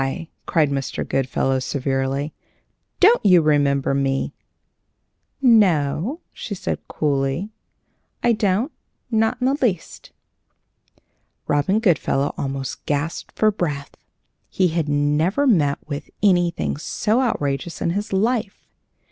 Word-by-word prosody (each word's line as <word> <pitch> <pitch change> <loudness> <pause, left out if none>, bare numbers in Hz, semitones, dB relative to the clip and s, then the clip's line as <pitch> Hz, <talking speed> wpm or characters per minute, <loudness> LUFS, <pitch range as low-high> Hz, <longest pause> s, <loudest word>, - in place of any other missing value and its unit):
cried 155 -4 +2
Mr. 135 -1 -3
Goodfellow, 135 0 0
severely. 135 +2 -2 0.7
"Don't 440 +6 +5
you 185 -3 +6
remember 140 -2 +2
me?" 135 -1 0 1.1
"No," 205 - +3
she 205 - -6
said, - - -3
coolly; 145 +6 -1 0.7
"I 240 - +4
don't, 210 - 0 0.4
not 225 +2 +2
in 250 - 0
the 265 - +3
least." 195 -10 -2 1.3
Robin 150 +9 +1
Goodfellow 155 -8 +1
almost 135 -1 -4
gasped 150 +3 -2
for 215 -1 +4
breath. 150 -8 -4 0.5
He 185 -2 +2
had 160 -2 -1
never 150 - +1
met 155 - +3
with 145 -1 -5
anything 175 -6 +2
so 215 - 0
outrageous 145 - -2
in 170 - 0
his 205 +4 -3
life. 210 +1 -1
160 Hz, 110 wpm, -22 LUFS, 140-210 Hz, 1.3 s, you